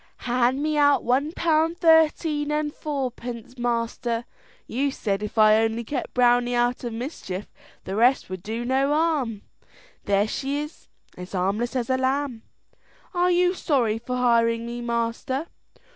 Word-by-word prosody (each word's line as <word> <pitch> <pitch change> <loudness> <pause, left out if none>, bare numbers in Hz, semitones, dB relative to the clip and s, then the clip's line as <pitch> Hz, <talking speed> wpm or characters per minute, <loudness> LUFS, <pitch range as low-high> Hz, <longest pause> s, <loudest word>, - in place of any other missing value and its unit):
"Hand 250 +3 +1
me 305 0 0
out 285 -1 +4
one 270 +6 +1
pound 325 0 +1
thirteen 320 -2 +3
and 300 0 -1
fourpence, 250 -4 -5
master. 235 0 -1 0.4
You 275 +5 -1
said 205 -7 -2
if 210 +2 -6
I 215 0 +6
only 225 +1 0
kept 280 +5 -5
Browney 245 0 +3
out 240 +1 +1
of 240 -2 -4
mischief, 225 - -6 0.3
the 190 - -5
rest 245 +5 +3
would 185 -1 -6
do 225 +5 -4
no 265 +2 +2
harm. 295 -9 0 0.6
There 200 +1 +2
she 275 +5 -2
is 300 +1 -8 0.3
as 180 +2 -9
harmless 200 +7 -1
as 245 -2 -1
a 260 - +2
lamb. 260 -2 -1 0.7
Are 355 0 +2
you 360 0 +3
sorry 245 - 0
for 250 +2 -4
hiring 230 -2 +2
me, 240 +1 -5
master?" 235 +4 -2
245 Hz, 150 wpm, -24 LUFS, 230-290 Hz, 0.7 s, I